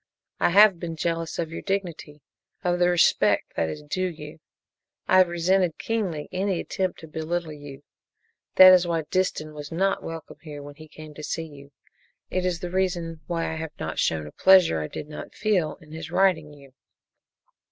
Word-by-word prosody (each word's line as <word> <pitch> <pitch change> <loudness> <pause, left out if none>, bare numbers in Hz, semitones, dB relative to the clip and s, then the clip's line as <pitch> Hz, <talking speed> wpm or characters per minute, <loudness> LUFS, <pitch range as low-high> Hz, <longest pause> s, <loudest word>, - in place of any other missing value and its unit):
"I - - +3
have 195 0 +6
been 165 -1 -5
jealous 165 0 -2
of 165 -1 -3
your 165 - -6
dignity 170 -7 -4 0.4
of 175 -1 0
the 175 0 +4
respect 175 -1 +2
that 80 - 0
is 150 - -7
due 185 +5 -2
you. 155 -1 -10 0.7
I 185 - +5
have 185 - +6
resented 175 0 +1
keenly 190 -10 -3
any 190 0 -1
attempt 185 -2 -3
to 160 - -10
belittle 160 +1 -3
you. 145 -1 -11 0.7
That 185 0 +10
is 180 -1 +4
why 165 -2 -1
Disston 170 -4 -1
was 150 0 -8
not 190 +4 0
welcome 165 -1 -8 0.2
when 145 0 -10
he 155 +2 -14
came 155 0 -12
to 150 - -10
see 165 +2 -3
you. 140 -2 -14 0.6
It 185 0 0
is 175 -2 -2
the 175 - -5
reason 175 -4 -2
why 165 -2 -2
I - - -5
have 160 -1 -7
not 80 0 -4
shown 80 -2 0
a 75 - -9
pleasure 185 - +5
I 75 - -3
did 145 - -7
not 150 - -9
feel 195 -7 0
in 155 -3 -18
his 160 0 -7
writing 175 -4 +2
you!" 140 -2 -16
165 Hz, 185 wpm, -25 LUFS, 150-185 Hz, 0.7 s, That